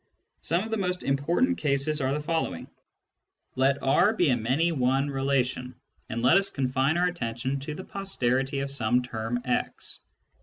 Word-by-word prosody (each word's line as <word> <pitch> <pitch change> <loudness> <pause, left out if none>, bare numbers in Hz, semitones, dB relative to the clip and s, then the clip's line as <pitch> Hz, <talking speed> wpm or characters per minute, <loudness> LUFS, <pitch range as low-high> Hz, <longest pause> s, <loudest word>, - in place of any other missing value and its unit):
Some 170 +4 0
of 225 - -7
the 225 - 0
most 180 -2 -2
important 170 - +1
cases 145 +1 0
are 130 0 +1
the 145 - 0
following: 160 +2 -2 0.9
Let 135 +2 +2
R 175 +10 +4
be 175 -8 +2
a 125 - +4
many 130 +9 +1
one 135 0 +1
relation, 135 -2 -1 0.3
and 115 +1 -3
let 130 +9 +6
us 195 - -1
confine 135 +3 0
our 175 - +3
attention 130 -5 -2
to 150 +2 -6
the 185 - -7
posterity 135 -9 -1
of 140 0 -3
some 125 -2 +1
term 120 0 -3
x. 125 - -3
140 Hz, 165 wpm, -27 LUFS, 125-165 Hz, 0.9 s, let